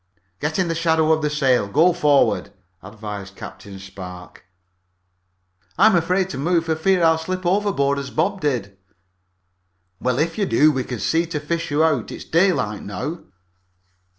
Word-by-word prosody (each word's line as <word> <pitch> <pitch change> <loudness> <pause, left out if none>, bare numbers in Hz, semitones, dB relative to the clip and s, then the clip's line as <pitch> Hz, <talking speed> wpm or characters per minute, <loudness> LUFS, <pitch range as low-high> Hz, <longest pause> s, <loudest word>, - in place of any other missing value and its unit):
"Get 150 +1 -2
in 185 -2 +1
the 165 - -1
shadow 160 -1 +2
of 160 0 +2
the 150 - 0
sail. 130 -7 +2
Go 160 - +4
forward," 145 -4 +2 0.3
advised 105 -1 -8
Captain 100 0 -10
Spark. 90 -2 -11 1.3
"I'm 220 -3 +5
afraid 180 +2 +1
to 135 - -5
move 165 +3 +1
for 160 -1 0
fear 180 +2 +2
I'll 160 0 +4
slip 185 +3 -4
overboard 175 -8 +1
as 140 0 -6
Bob 190 +8 -1
did." 115 -10 -2 1.2
"Well, 125 -1 0
if 165 +6 -1
you 200 - +1
do 155 +1 +4
we 130 -3 -2
can 125 - -5
see 160 - 0
to 160 -2 -3
fish 165 +3 -3
you 145 +2 +2
out. 150 -8 +1
It's - - -8
daylight 160 - +1
now." 145 - -5
155 Hz, 160 wpm, -21 LUFS, 125-170 Hz, 1.3 s, I'm